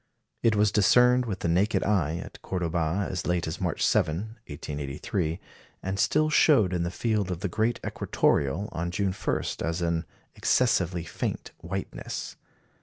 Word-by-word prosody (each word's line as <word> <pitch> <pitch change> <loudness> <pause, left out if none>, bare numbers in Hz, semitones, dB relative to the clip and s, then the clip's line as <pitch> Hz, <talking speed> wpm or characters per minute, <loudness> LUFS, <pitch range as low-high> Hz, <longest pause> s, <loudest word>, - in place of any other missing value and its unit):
It 115 -2 +3
was 105 -1 +3
discerned 125 +4 +5
with 100 -4 -4
the - - 0
naked 95 +6 +2
eye 85 -6 +1
at - - -9
Cordoba 85 +1 -1
as 90 - -3
late 90 -1 +1
as 80 - -5
March - - 0
7, 105 +9 0
1883, 75 +4 -3 0.4
and 95 +1 -2
still 155 +7 +3
showed 110 - +5
in 90 - 0
the 85 - 0
field 105 0 -1
of 90 -1 -4
the 100 - 0
great 110 +6 0
equatoreal 75 +9 +1
on 85 +2 -3
June 95 +1 0
1 - - -1 0.2
as 80 +1 -1
an 85 -1 0 0.3
"excessively 90 -8 +2
faint 85 - -4
whiteness." 95 +3 -5
95 Hz, 155 wpm, -27 LUFS, 85-105 Hz, 0.4 s, discerned